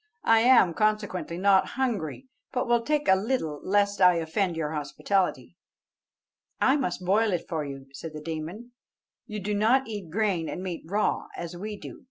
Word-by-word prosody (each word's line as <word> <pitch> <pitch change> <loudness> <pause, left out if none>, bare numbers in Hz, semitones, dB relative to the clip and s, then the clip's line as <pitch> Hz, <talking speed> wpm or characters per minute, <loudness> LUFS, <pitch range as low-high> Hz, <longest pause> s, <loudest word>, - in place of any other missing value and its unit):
I 225 0 +6
am, 235 -7 +5
consequently, 205 -4 -1
not 195 +1 +4
hungry, 235 - -2 0.3
but 250 -1 -1
will 240 0 +3
take 295 +4 0
a 190 - +7
little 190 - -2
lest 200 0 +1
I 180 -1 +7
offend 170 +2 -1
your 155 -2 -2
hospitality." 170 +5 -1 1.0
"I 265 - +4
must 185 -10 -2
boil 210 +4 +3
it 175 - -2
for 160 -3 -2
you," 135 -1 -7
said 155 +3 -8
the - - -5
demon; 165 +9 -6 0.6
"you 210 0 -5
do 205 +2 -2
not 230 +6 +3
eat 205 -6 -6
grain 190 -3 0
and 185 - -5
meat 180 -3 -4
raw, 205 +4 0
as 170 0 -6
we 210 +4 -6
do. - - -10
195 Hz, 175 wpm, -27 LUFS, 165-220 Hz, 1.0 s, a